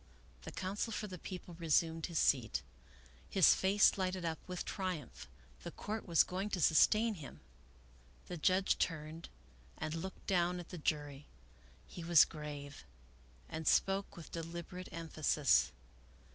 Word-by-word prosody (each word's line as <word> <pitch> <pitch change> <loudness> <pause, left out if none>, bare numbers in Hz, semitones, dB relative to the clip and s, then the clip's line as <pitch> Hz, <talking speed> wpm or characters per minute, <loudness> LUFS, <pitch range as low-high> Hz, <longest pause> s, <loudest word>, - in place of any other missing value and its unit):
The - - -8
counsel 200 +5 -3
for 215 - -3
the 185 -4 -8
People 180 0 -8
resumed 165 0 +1
his 170 -3 -4
seat. 125 -7 +2 0.7
His 190 - +6
face 195 +1 +4
lighted 185 -1 -1
up 160 -1 -2
with 180 -1 -4
triumph. 180 - -4 0.3
The - - -6
Court 215 0 -5
was 170 -2 +5
going 190 +3 -3
to 195 - -2
sustain 215 +8 +4
him. 155 -8 -10 0.9
The 180 - -6
judge 185 +4 +2
turned 160 0 -3 0.5
and 155 - -3
looked 175 +3 -6
down 180 -1 +1
at 175 - -9
the 180 - -7
jury. 145 -2 -2 0.6
He 175 - -9
was 170 -1 +7
grave, 145 -2 -8 0.6
and 160 0 -5
spoke 195 0 +2
with 165 - -10
deliberate 170 +2 -6
emphasis. 150 - +2
170 Hz, 140 wpm, -35 LUFS, 155-185 Hz, 0.9 s, was